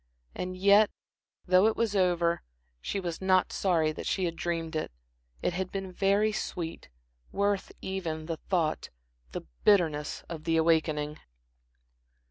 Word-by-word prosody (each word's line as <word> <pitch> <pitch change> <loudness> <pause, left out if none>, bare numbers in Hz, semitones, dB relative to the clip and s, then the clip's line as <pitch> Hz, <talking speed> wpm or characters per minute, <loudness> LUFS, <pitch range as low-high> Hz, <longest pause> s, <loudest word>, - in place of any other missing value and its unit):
And 185 0 -4
yet, 200 +2 +6 0.6
though 185 +3 +5
it 220 - +1
was 225 -3 0
over, 175 -3 +2 0.4
she 200 - -2
was 175 -2 -4
not 185 -1 +3
sorry 165 -5 +2
that - - -6
she 190 - +1
had 170 -1 -2
dreamed 165 -1 -3
it. 155 - -2 0.5
It - - +1
had 185 +1 -3
been 195 -1 -4
very 200 +3 +2
sweet, 175 -5 -4 0.4
worth 200 0 0
even, 165 -5 -3
she 165 0 -2
thought, 170 -5 0 0.4
the - - -4 0.2
bitterness 160 -7 +2
of 160 -2 -7
the 165 -1 +2
awakening. 155 -2 +1
180 Hz, 140 wpm, -29 LUFS, 165-195 Hz, 0.6 s, yet